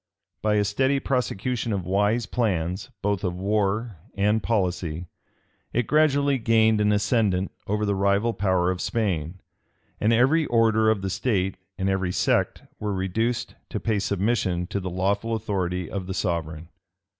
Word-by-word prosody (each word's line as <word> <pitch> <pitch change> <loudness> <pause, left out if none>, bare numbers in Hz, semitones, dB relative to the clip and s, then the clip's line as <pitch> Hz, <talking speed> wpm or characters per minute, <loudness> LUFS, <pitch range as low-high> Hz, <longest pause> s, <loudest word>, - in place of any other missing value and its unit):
By 105 0 +2
a 105 - +3
steady 130 +7 +1
prosecution 125 -3 -1
of 95 -4 -2
wise 105 +5 +1
plans, 95 -3 -1
both 100 -2 0
of 90 -1 -1
war 105 +2 0 0.2
and 105 +2 +2
policy, 90 -6 -1 0.7
it 120 0 +1
gradually 145 -2 +3
gained 110 -1 +3
an 105 0 +3
ascendant 105 -3 +1 0.2
over 105 +1 0
the 100 - +1
rival 100 +4 +2
power 95 -2 +1
of 90 - -4
Spain; 95 -6 -2 0.6
and 110 - +2
every 135 +7 +3
order 110 -2 +3
of 105 -3 +1
the 95 - -2
state, 95 -4 0 0.2
and 95 -1 -1
every 95 -2 0
sect, - - +1 0.2
were 105 -1 -2
reduced 115 +6 -1 0.2
to 105 - -3
pay 110 -1 0
submission 100 -3 0
to 100 +2 -3
the 95 -1 -4
lawful 100 +5 0
authority 90 -5 -2
of 95 0 -5
the 95 - -4
sovereign. 80 -3 -3
100 Hz, 155 wpm, -25 LUFS, 95-115 Hz, 0.7 s, a